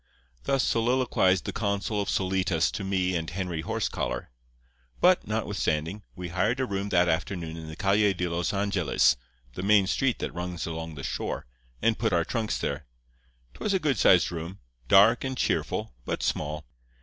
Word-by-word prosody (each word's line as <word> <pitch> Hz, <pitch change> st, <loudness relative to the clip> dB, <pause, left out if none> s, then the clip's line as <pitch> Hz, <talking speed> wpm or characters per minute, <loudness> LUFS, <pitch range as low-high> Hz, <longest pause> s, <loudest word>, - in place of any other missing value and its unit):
"Thus 135 Hz, -3 st, +2 dB
soliloquized 115 Hz, -6 st, +2 dB
the -, -, -3 dB
consul 100 Hz, 0 st, -1 dB
of 100 Hz, -, -3 dB
Solitas 95 Hz, -3 st, +1 dB
to 100 Hz, -, -4 dB
me 95 Hz, -2 st, 0 dB
and 80 Hz, -1 st, -2 dB
Henry 90 Hz, -3 st, -3 dB
Horsecollar. 110 Hz, -, -3 dB, 0.7 s
"But, -, -, +4 dB
notwithstanding, 80 Hz, +7 st, -1 dB
we 90 Hz, -2 st, -6 dB
hired 105 Hz, +8 st, 0 dB
a 130 Hz, -, +1 dB
room 100 Hz, -2 st, -3 dB
that 90 Hz, -2 st, +3 dB
afternoon 85 Hz, -1 st, -2 dB
in 80 Hz, -1 st, -8 dB
the 80 Hz, -, -7 dB
Calle 100 Hz, +2 st, +3 dB
de 90 Hz, 0 st, -1 dB
los 85 Hz, +1 st, -1 dB
Angeles, 100 Hz, -6 st, +2 dB, 0.4 s
the 90 Hz, -, -5 dB
main 100 Hz, 0 st, +5 dB
street 125 Hz, +6 st, +1 dB
that -, -, -4 dB
runs 90 Hz, 0 st, -4 dB
along 80 Hz, -1 st, -5 dB
the 70 Hz, -, -7 dB
shore, -, -, -3 dB, 0.4 s
and 115 Hz, -1 st, +2 dB
put 110 Hz, -3 st, +1 dB
our 85 Hz, -1 st, +2 dB
trunks 115 Hz, -3 st, -1 dB
there. -, -, -3 dB, 0.7 s
'Twas 200 Hz, -, -1 dB
a -, -, +2 dB
good 145 Hz, -6 st, 0 dB
sized 90 Hz, -2 st, +5 dB
room, 85 Hz, +3 st, -6 dB, 0.3 s
dark 105 Hz, -, +6 dB
and 130 Hz, -1 st, -3 dB
cheerful, -, -, -1 dB
but -, -, -3 dB
small. 75 Hz, 0 st, -2 dB
95 Hz, 170 wpm, -27 LUFS, 85-105 Hz, 0.7 s, dark